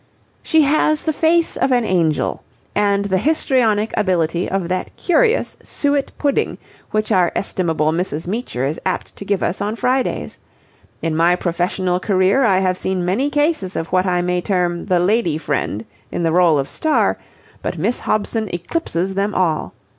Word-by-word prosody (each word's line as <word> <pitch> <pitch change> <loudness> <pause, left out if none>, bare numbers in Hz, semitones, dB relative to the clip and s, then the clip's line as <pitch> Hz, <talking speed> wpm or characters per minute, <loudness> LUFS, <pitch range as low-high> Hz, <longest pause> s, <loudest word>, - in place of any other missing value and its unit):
"She 320 -2 +3
has 305 +1 +2
the 315 - 0
face 330 +2 +2
of 270 - +1
an 245 -2 +3
angel 165 -6 0 0.3
and 200 -1 +1
the 190 -2 +1
histrionic 230 - +1
ability 175 -4 0
of 190 -2 -1
that 185 +1 -2
curious 470 +6 +1
suet 285 -1 -1
pudding 285 -2 0 0.3
which 215 +1 -1
our 185 -4 +3
estimable 165 -5 0
Mrs. 165 -2 -2
Meecher 185 - -3
is 150 +4 -3
apt 185 -1 -3
to - - -8
give 200 -1 -1
us 185 - -1
on 210 +2 -1
Fridays. 255 +2 -1 0.6
In 165 -1 0
my 170 +2 +4
professional 180 +1 -1
career 195 +6 +2
I 200 -6 +4
have 185 -1 +1
seen 185 -2 -1
many 210 +11 +1
cases 290 - 0
of 165 - -3
what 185 +1 +2
I 180 -1 +1
may 180 0 0
term 175 -3 -1
the 180 -1 +3
Lady 180 -3 +1
Friend 135 -8 -2 0.3
in 175 - -2
the 165 - +2
role 170 -2 +4
of 135 -1 -1
star, 315 -1 +1 0.4
but - - -3
Miss 245 - 0
Hobson 215 0 -1
eclipses 180 - -2
them 200 +2 -1
all. 165 -4 0
190 Hz, 170 wpm, -19 LUFS, 175-235 Hz, 0.6 s, my